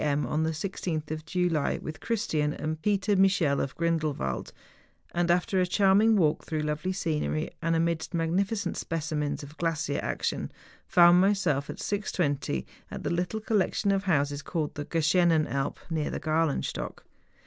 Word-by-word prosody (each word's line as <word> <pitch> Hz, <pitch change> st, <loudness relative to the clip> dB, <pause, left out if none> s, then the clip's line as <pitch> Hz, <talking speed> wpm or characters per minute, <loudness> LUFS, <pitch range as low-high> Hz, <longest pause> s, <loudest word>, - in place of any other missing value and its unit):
m. 145 Hz, -1 st, +1 dB
on 155 Hz, -, -1 dB
the 160 Hz, -, +1 dB
16th 160 Hz, -2 st, -3 dB
of 155 Hz, 0 st, -5 dB
July, 175 Hz, -4 st, +1 dB
with 155 Hz, -, -7 dB
Christian 155 Hz, -10 st, 0 dB
and 155 Hz, 0 st, -4 dB
Peter 205 Hz, +1 st, +1 dB
Michel 190 Hz, -7 st, +3 dB
of 135 Hz, -, -3 dB
Grindelwald, 155 Hz, -, -1 dB, 0.6 s
and, 175 Hz, 0 st, +1 dB
after 180 Hz, +2 st, +2 dB
a 180 Hz, -, +1 dB
charming 200 Hz, +4 st, +4 dB
walk 160 Hz, -7 st, +2 dB
through 155 Hz, -1 st, -2 dB
lovely 150 Hz, +5 st, -1 dB
scenery 155 Hz, -4 st, -1 dB
and 165 Hz, 0 st, +1 dB
amidst 165 Hz, +1 st, 0 dB
magnificent 190 Hz, +4 st, 0 dB
specimens 150 Hz, -3 st, -2 dB
of 145 Hz, +2 st, -11 dB
glacier 165 Hz, -4 st, -1 dB
action, -, -, -2 dB, 0.4 s
found 175 Hz, +1 st, +6 dB
injself, 180 Hz, -9 st, +1 dB
at -, -, -5 dB
6.20, 145 Hz, -, -1 dB, 0.2 s
at -, -, -7 dB
the -, -, -1 dB
little 180 Hz, +5 st, -1 dB
collection 205 Hz, -2 st, +1 dB
of 195 Hz, 0 st, 0 dB
houses 145 Hz, -5 st, +1 dB
called 155 Hz, 0 st, -3 dB
the 145 Hz, -, -5 dB
Geschenen 165 Hz, 0 st, +3 dB
Alp 135 Hz, 0 st, -2 dB
(near 155 Hz, -2 st, 0 dB
the -, -, -3 dB
Galenstock). 155 Hz, -1 st, -1 dB
165 Hz, 155 wpm, -28 LUFS, 150-185 Hz, 0.6 s, found